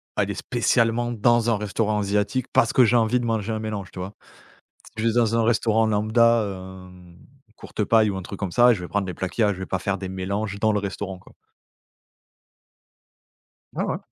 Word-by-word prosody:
aller - - 0
spécialement 120 +1 0
dans 120 +1 +2
un - - 0
restaurant 105 +1 -1
asiatique 105 +5 -1
parce 115 - +3
que 125 - +6
j'ai 120 +2 +2
envie 115 +2 +3
de 120 - -3
manger 110 -1 -1
un 110 - -3
mélange, 105 -3 -5
tu 90 - -9
vois? 95 +3 -6 0.8
Je 110 +1 -1
vais 115 - +3
dans 115 -1 +2
un 115 - +2
restaurant 115 -1 +2
lambda, 110 +2 +3 0.5
hem, 90 -1 -16 0.4
Courtepaille 110 0 +1
ou 95 - -4
un 95 - -5
truc 95 +2 -9
comme 95 - -2
ça, 120 0 +6
et - - +2
je 95 - -7
vais 90 - -7
prendre 100 -2 -1
les 90 - -5
plats 95 - -3
qu'il 115 - -2
y - - +5
a. 105 - +2
Je 95 - -8
vais 95 - -5
pas 95 - -2
faire 100 +1 -2
des 95 - -6
mélanges 100 +2 -3
dans 110 +1 +2
le 105 - +1
restaurant, 95 -1 -5
quoi. - - -19 2.4
Ouais, - - -1
ouais. - - -2
105 Hz, 215 wpm, -23 LUFS, 100-115 Hz, 2.4 s, que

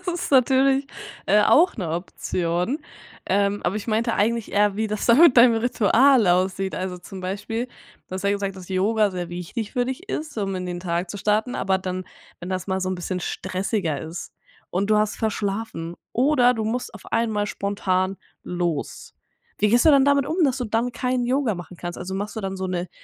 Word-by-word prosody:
das 370 - -19 0.2
ist - - -5
natürlich, 270 +1 +4 0.4
äh, 210 +2 +5
auch 340 - +4
'ne 185 -7 -3
Option, 175 - -2 0.5
ähm, 200 +1 +1
aber 175 - +1
ich 215 +2 -6
meinte 225 +2 +1
eigentlich 230 +1 0
eher 205 -1 +3
wie 220 +1 0
das 210 0 -3
da 235 - +7
mit 310 -2 +7
deinem 235 -1 +7
Ritual 240 +1 +4
aussieht, 185 +2 +1
also 185 -1 -4
zum 185 +2 -10
Beispiel, 205 +6 -3
du 245 - -21
hast 190 - -4
ja 200 - +2
gesagt, 200 -1 -2
dass 185 -2 -11
Yoga 205 +3 +2
sehr 180 -2 -4
wichtig 180 +6 -5
für 245 - +1
dich 265 +10 -6
ist, 305 -5 -4
um 195 -2 -1
in 180 -1 -4
den 175 0 -4
Tag 175 0 -2
zu - - -5
starten, 215 +4 0
aber 190 0 +1
dann, 185 0 -4 0.3
wenn 175 - -8
das 185 0 -3
mal 190 0 0
so 185 - -1
'n 185 - -1
bisschen 180 +1 -3
stressiger 185 - -2
ist 160 +2 -7 0.4
und 195 +3 -1
du 215 - +4
hast 210 0 +1
verschlafen 205 -5 -3 0.2
oder 250 -1 +4
du 220 -2 -2
musst 235 +2 -3
auf 215 - -12
einmal 220 -3 +1
spontan 195 -2 -1 0.3
los. 175 -4 -3 0.5
Wie 210 - +4
gehst 240 +5 +4
du 315 - +7
dann 275 -2 +6
damit 280 -1 +3
um, 330 +3 +1
dass 265 -3 +1
du 250 - -2
dann 230 +2 -1
kein 250 +1 -1
Yoga 250 -5 +1
machen 175 +1 -9
kannst, 175 0 -6
also 190 +1 -5
machst 205 +3 -4
du - - -2
dann 195 -1 -4
so 190 0 -3
'ne 180 -1 -3
205 Hz, 210 wpm, -23 LUFS, 185-235 Hz, 0.5 s, da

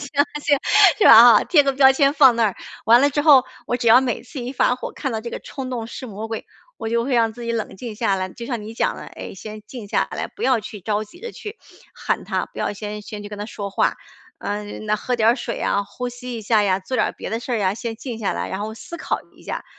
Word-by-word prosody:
行， 285 0 +1 0.2
行， 290 -2 +2 0.4
是 - - +3
吧 235 +1 +10
哈？ - - +4
贴 295 -5 +4
个 275 - +2
标 265 0 +6
签 275 0 +3
放 265 -6 +6
那 230 - +3
儿， 205 -4 0 0.3
完 235 +2 +6
了 285 +1 +4
之 290 - 0
后， 285 -4 +7 0.2
我 245 - 0
只 235 -2 0
要 235 - +8
每 250 -4 -2
次 260 +3 -10
一 245 +2 -5
发 245 -1 +2
火， - - -6
看 270 - -4
到 220 -1 -3
这 235 - -7
个 - - -6
“冲 265 -2 -6
动 235 -3 -4
是 255 - -7
魔 220 +1 -7
鬼”， 225 - -5 0.3
我 225 - -4
就 235 0 +1
会 270 - -2
让 230 -2 +3
自 240 +1 -10
己 235 - -3
冷 225 -4 -3
静 225 -1 -7
下 225 -4 +1
来。 185 -1 -2
就 235 +5 -9
像 240 -5 -3
你 215 - -8
讲 225 - 0
的， - - -9
诶， - - -9
先 215 +2 -9
静 225 -5 -9
下 - - +1
来， - - -4
不 430 - -11
要 250 -4 +3
去 210 0 -9
着 210 +2 -1
急 280 +12 -13
地 470 - -7
去 420 +1 -9 0.3
喊 - - -2
他， - - -2
不 - - -14
要 - - -1
先 210 +1 -6
先 210 0 -8
去 - - -7
跟 210 - -8
他 205 +1 -5
说 200 -2 -6
话， 195 - 0 0.4
呃， 205 +1 -3 0.2
那 215 0 0
喝 245 +4 -2
点 225 -1 +4
儿 240 - +3
水 250 - -5
啊， 200 - +1
呼 250 +4 -6
吸 245 0 -7
一 - - -8
下 215 0 +3
呀， 190 -2 +2
做 250 +7 -4
点 215 - +2
儿 - - -6
别 - - -7
的 225 +1 -2
事 255 - -8
儿 230 -3 0
啊， 190 +1 +1
先 230 -1 -5
静 240 -1 -6
下 200 - 0
来。 - - -3
然 190 - -4
后 220 +1 -4
思 340 +8 -9
考 - - -2 0.2
一 - - -18
下， - - -5
235 Hz, 305 characters per minute, -21 LUFS, 210-255 Hz, 0.4 s, 吧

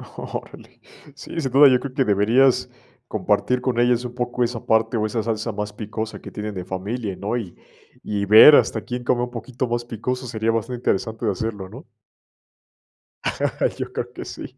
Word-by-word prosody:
Órale. - - -8 0.4
Sí, 155 +3 -7
sin 135 -4 -2
duda, 140 +2 +8
yo 130 -2 +4
creo 140 0 -7
que 135 - +2
deberías 115 +6 +3 0.4
compartir 125 0 0
con 125 -2 -1
ellas 120 0 +2
un 120 - -6
poco 125 0 -1
esa 120 -1 -3
parte 110 +1 +2
o 110 - 0
esa 110 0 -2
salsa 115 0 -2
más 105 0 -5
picosa 110 +1 -5
que - - -10
tienen 105 0 -5
de 90 -2 -5
familia, 100 +3 -4
¿no? 100 +6 -3
Y 100 -7 -6 0.5
y 100 -1 -2
ver 110 +9 +9
hasta - - +2
quién 125 0 -5
come 120 0 +1
un 125 - -4
poquito 125 +2 -4
más 120 0 -1
picoso, 125 +3 -4
sería 110 -1 0
bastante 115 +2 -2
interesante 110 0 -1
de 105 - +2
hacerlo, 100 -2 -4
¿no? - - -11 1.9
Yo - - -5
creo - - -4
que - - -7
sí. - - -9
115 Hz, 185 wpm, -22 LUFS, 105-125 Hz, 1.9 s, ver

